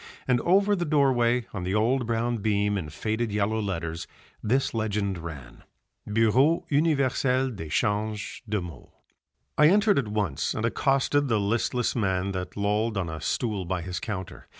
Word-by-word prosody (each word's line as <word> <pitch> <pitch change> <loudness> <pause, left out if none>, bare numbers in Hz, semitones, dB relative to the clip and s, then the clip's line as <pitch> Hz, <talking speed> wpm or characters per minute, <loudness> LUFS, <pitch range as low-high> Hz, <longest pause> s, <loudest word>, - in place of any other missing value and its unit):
And 125 -2 +2
over 200 +3 +3
the 175 - -1
doorway 125 -6 +2
on 95 -4 -4
the 95 +3 -1
old 120 +3 +1
brown 120 +1 0
beam 105 -1 +1
in 85 -6 -3
faded 110 +8 -2
yellow 105 +2 0
letters 85 -4 -4 0.3
this 130 +5 +1
legend 105 -4 -1
ran, 75 -7 -9 0.5
Bureau 120 +9 +3
Universel 135 -3 +2
d'Echanges 105 +3 -2
de 105 0 +1
Maux. 85 -7 -10 0.7
I 150 - +8
entered 205 0 +4
at 125 - -2
once 100 -9 -1
and 110 - -1
accosted 135 +4 +1
the 110 -4 +2
listless 115 +4 0
man 95 -4 0
that 90 0 -5
lolled 105 +2 0
on 90 -4 -1
a 80 -1 -6
stool 105 +3 -1
by 90 -1 -3
his 90 0 -4
counter. 95 -5 -6
110 Hz, 155 wpm, -26 LUFS, 95-125 Hz, 0.7 s, I